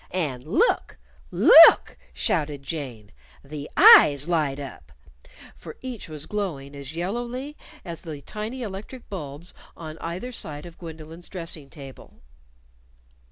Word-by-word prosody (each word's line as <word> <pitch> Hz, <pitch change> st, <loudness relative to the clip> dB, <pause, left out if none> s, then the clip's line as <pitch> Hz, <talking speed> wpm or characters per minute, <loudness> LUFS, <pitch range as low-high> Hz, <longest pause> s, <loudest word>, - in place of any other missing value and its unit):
"And 145 Hz, -9 st, -3 dB
look! -, -, +1 dB, 0.3 s
Look!" -, -, +8 dB, 0.2 s
shouted 145 Hz, -, -2 dB
Jane 130 Hz, -9 st, -7 dB, 0.3 s
"The 145 Hz, 0 st, -8 dB
eyes 310 Hz, -, +8 dB
light 150 Hz, -5 st, 0 dB
up" 135 Hz, -, -10 dB, 0.6 s
For -, -, -11 dB
each 250 Hz, -8 st, -7 dB
was 155 Hz, -1 st, -7 dB
glowing 155 Hz, -10 st, -4 dB
as 140 Hz, +2 st, -8 dB
yellowly 240 Hz, -, -4 dB, 0.3 s
as 170 Hz, -2 st, -7 dB
the 155 Hz, -5 st, -8 dB
tiny 225 Hz, +4 st, -6 dB
electric 215 Hz, +5 st, -8 dB
bulbs 155 Hz, -3 st, -8 dB, 0.2 s
on 160 Hz, -1 st, -9 dB
either 180 Hz, +10 st, -5 dB
side 150 Hz, -10 st, -7 dB
of 170 Hz, -1 st, -13 dB
Gwendolyn's 165 Hz, 0 st, -10 dB
dressing 165 Hz, -6 st, -6 dB
table. 135 Hz, -3 st, -13 dB
165 Hz, 120 wpm, -24 LUFS, 145-195 Hz, 0.6 s, Look